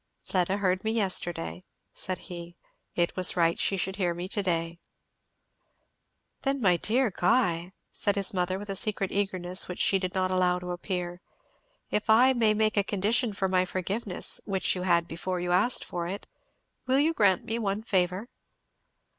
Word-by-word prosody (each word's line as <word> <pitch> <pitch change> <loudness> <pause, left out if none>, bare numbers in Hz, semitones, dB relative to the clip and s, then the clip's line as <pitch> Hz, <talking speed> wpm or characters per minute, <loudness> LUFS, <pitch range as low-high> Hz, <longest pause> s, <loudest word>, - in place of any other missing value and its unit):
"Fleda 185 +1 0
heard 185 -2 0
me 220 - 0
yesterday," 185 -5 0 0.3
said 185 -1 -4
he; 175 -2 -9 0.4
"it 175 0 0
was 185 -1 +3
right 170 -1 +2
she 195 - +1
should 190 +1 -2
hear 175 -4 0
me 175 +1 -5
to 205 - +1
day." 170 -2 -2 1.6
"Then 275 0 0
my 185 -7 +4
dear 235 +5 +1
Guy," 180 -3 +1 0.2
said 205 - 0
his 200 -1 +2
mother 185 0 0
with 205 0 -6
a - - -3
secret 195 -1 0
eagerness 185 -2 0
which 180 - -6
she 195 - +3
did 185 0 -4
not 185 0 +1
allow 180 -1 +2
to 180 0 -6
appear, 175 -1 -4 0.7
"if 210 +1 -1
I 250 +4 +6
may 225 -4 +2
make 215 0 +1
a 200 - +4
condition 210 +4 +1
for 195 -1 -1
my 185 -1 +2
forgiveness, 185 +3 -1
which 195 -2 +1
you 180 - -4
had 170 -2 +2
before 180 +2 -3
you 175 0 -2
asked 195 +8 +3
for 170 -1 -4
it, 195 +3 -5 0.6
will 260 +1 +3
you 310 +4 +3
grant 195 - +2
me 230 0 -2
one 205 -1 -2
favour?" 185 0 0
185 Hz, 175 wpm, -28 LUFS, 180-210 Hz, 1.6 s, I